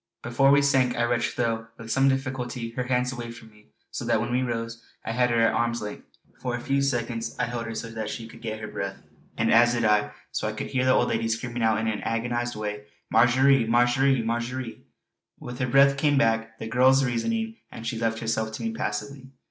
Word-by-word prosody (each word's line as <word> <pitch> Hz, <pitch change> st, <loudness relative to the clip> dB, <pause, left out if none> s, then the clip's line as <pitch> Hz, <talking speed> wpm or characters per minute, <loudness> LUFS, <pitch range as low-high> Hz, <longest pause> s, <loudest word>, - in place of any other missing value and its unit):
Before 120 Hz, +3 st, +3 dB
we 140 Hz, 0 st, +5 dB
sank 130 Hz, -3 st, +3 dB
I 120 Hz, -, +2 dB
wrenched, 120 Hz, 0 st, 0 dB
though 115 Hz, -2 st, -1 dB
with 115 Hz, -1 st, -8 dB
some 135 Hz, +4 st, +4 dB
difficulty 130 Hz, -3 st, -3 dB
her 125 Hz, +1 st, -3 dB
hands 125 Hz, 0 st, +1 dB
away 120 Hz, -2 st, -6 dB
from 115 Hz, -1 st, -12 dB
me, 105 Hz, 0 st, -22 dB, 0.2 s
so -, -, -4 dB
that -, -, +2 dB
when -, -, -2 dB
we 125 Hz, +1 st, +1 dB
rose 115 Hz, -2 st, -4 dB, 0.2 s
I -, -, -2 dB
had 125 Hz, +1 st, +2 dB
her 115 Hz, -1 st, +2 dB
at 115 Hz, 0 st, +4 dB
arm's 120 Hz, -1 st, 0 dB
length. 105 Hz, -1 st, -7 dB, 0.3 s
For 125 Hz, -1 st, -2 dB
a -, -, -4 dB
few 135 Hz, +3 st, 0 dB
seconds 120 Hz, -4 st, -2 dB
I -, -, 0 dB
held 120 Hz, 0 st, -4 dB
her 115 Hz, -, -5 dB
so 115 Hz, +1 st, -5 dB
that 110 Hz, -2 st, -4 dB
she 115 Hz, -2 st, -6 dB
could -, -, -14 dB
get 110 Hz, -2 st, -4 dB
her 110 Hz, -, -5 dB
breath; -, -, -5 dB, 0.3 s
and 115 Hz, 0 st, +2 dB
as 120 Hz, +1 st, +5 dB
I 105 Hz, -3 st, +3 dB
did -, -, -8 dB, 0.2 s
so -, -, -2 dB
I -, -, -2 dB
could -, -, -5 dB
hear 130 Hz, -1 st, +1 dB
the 130 Hz, -, +5 dB
old 120 Hz, -, +2 dB
lady 115 Hz, 0 st, 0 dB
screaming 120 Hz, +2 st, -3 dB
out 110 Hz, -1 st, +3 dB
in 110 Hz, 0 st, -1 dB
an 110 Hz, -1 st, -2 dB
agonised 120 Hz, +1 st, -2 dB
way: 105 Hz, -1 st, -5 dB, 0.3 s
"Marjory! 125 Hz, +2 st, +4 dB
Marjory! 125 Hz, +2 st, +3 dB
Marjory!" 120 Hz, +1 st, -3 dB, 0.6 s
With 120 Hz, 0 st, -8 dB
her 125 Hz, -, 0 dB
breath 140 Hz, +2 st, +5 dB
came 145 Hz, 0 st, +2 dB
back 115 Hz, -3 st, +1 dB
the -, -, -6 dB
girl's 130 Hz, +3 st, +4 dB
reason, 225 Hz, -, -1 dB, 0.2 s
and 115 Hz, -, -9 dB
she 115 Hz, 0 st, -3 dB
left 115 Hz, -1 st, 0 dB
herself 110 Hz, -1 st, -1 dB
to -, -, -6 dB
me 225 Hz, -, -1 dB
passively. 140 Hz, -11 st, -4 dB
120 Hz, 230 wpm, -26 LUFS, 115-130 Hz, 0.6 s, we